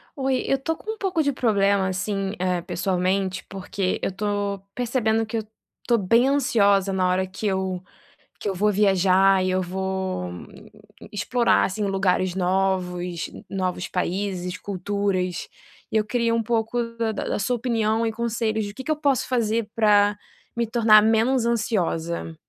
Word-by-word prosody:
Oi, 265 -2 0
eu - - +3
estou 315 +4 -2
com 435 - -5
um 445 - -11
pouco 370 -5 0
de 285 -2 +1
problema 200 -5 +2
assim 195 +1 -2
eh, 180 -1 0
pessoalmente 185 +1 -1
porque 190 0 -2
eu - - 0
estou 205 0 -2
percebendo 225 -2 0
que 220 +1 -3
eu 220 - -2 0.4
estou 235 - +2
bem 230 +5 +3
ansiosa 205 -8 +3
na 185 -1 +1
hora 185 +1 +1
que 195 +3 -7
eu, 190 -2 -1 0.6
que - - -3
eu 195 - -1
vou 210 +3 +2
viajar 195 -1 +4
e 185 - 0
eu 185 0 +1
vou 190 - -3 0.8
explorar 235 +4 +2
assim 205 +2 -2
lugares 185 -2 +1
novos, 180 -2 -1 0.2
novos 185 -2 -2
países, 180 0 -2
culturas, 195 -2 -2 0.4
e - - +1
eu 215 - +1
queria 230 +1 0
um 230 - +1
pouco 230 +1 0
da 225 -1 0
da 210 - -4
da - - -2
sua 245 +5 0
opinião 225 -2 0
e 225 - -1
conselhos, 220 -1 -1
o 205 - -9
que 265 - -7
que 315 - -4
eu 310 - +2
posso 280 -4 +1
fazer 230 -3 0
para 205 -2 +4 0.4
me 235 0 0
tornar 220 -2 +6
menos 225 +3 +3
ansiosa? 170 -8 -1
205 Hz, 165 wpm, -24 LUFS, 185-230 Hz, 0.8 s, tornar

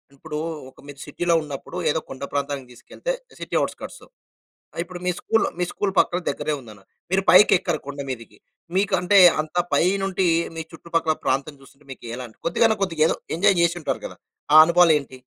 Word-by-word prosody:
ఇప్పుడు 150 +2 -7 0.3
ఒక - - -22
మీరు 140 -1 -11
సిటీలో 175 -1 -1
ఉన్నప్పుడు 145 +4 -8
ఏదో 160 - +1
కొండ 135 +1 -8
ప్రాంతానికి 140 -2 -3
తీసుకెళ్తే - - -5 0.3
సిటీ - - -5
ఔట్‌స్క‌ర్ట్స్. - - -6 0.8
ఇప్పుడు 175 0 -9
మీ 180 - +2
స్కూల్ 225 0 +1 0.3
స్కూల్ 200 -2 -2
పక్కన 180 - +2
దగ్గరే 155 - -2
ఉందని. 105 -5 -14 0.3
మీరు 190 0 +2
పైకి 190 +3 +7
ఎక్కరు 170 -5 -2
కొండ 145 0 -6
మీదకి. 115 -3 -7 0.4
మీకు 195 0 +1
అంటే 180 +3 +3 0.2
అంత 155 +2 -11 0.2
పైనుండి 190 0 +1 0.3
మీ - - -2
చుట్టుపక్కల 165 -1 -1
ప్రాంతం 140 +3 -1
చూస్తుంటే 135 +1 -20
మీకు 125 - -11
ఎలాంటి 125 -3 -9
కొద్దిగన్నా 220 +5 +2
కొద్దిగా 165 -5 0
ఏదో - - -1 0.2
ఎంజాయ్ 195 0 +3
చేసుంటారు 170 -1 -1
కదా! - - -8 0.4
ఆ - - +10
అనుభవాలేంటి? 160 -6 +3
160 Hz, 160 wpm, -23 LUFS, 140-180 Hz, 0.8 s, ఆ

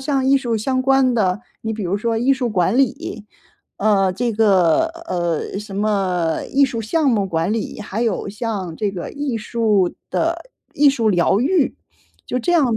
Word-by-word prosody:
像 270 -1 0
艺 275 +1 +4
术 240 -4 -1
相 255 +4 0
关 270 -2 +3
的， 195 -3 +1 0.2
你 225 - -2
比 215 -1 -5
如 185 +2 -1
说 225 +2 -1
艺 260 +4 +3
术 255 -3 -1
管 190 +2 +1
理， 225 -4 -1 0.5
呃， 195 -3 +2
这 235 +4 -1
个 200 - +3 0.2
呃， 175 +2 -2
什 205 -2 -8
么 190 -5 0
艺 280 +1 +5
术 235 -4 -2
项 290 +6 +1
目 205 -5 +1
管 170 +3 -1
理， 220 -1 -4
还 210 +2 -3
有 215 -3 -1
像 200 -6 -4
这 210 -2 -1
个 175 - -6
艺 285 -5 -3
术 215 -4 +1 0.2
的 - - -2 0.2
艺 285 -1 +5
术 230 -5 0
疗 190 +2 +2
愈。 305 +2 +2 0.5
就 250 - -1
这 350 - 0
样 265 -9 +3
220 Hz, 195 characters per minute, -20 LUFS, 195-255 Hz, 0.5 s, 艺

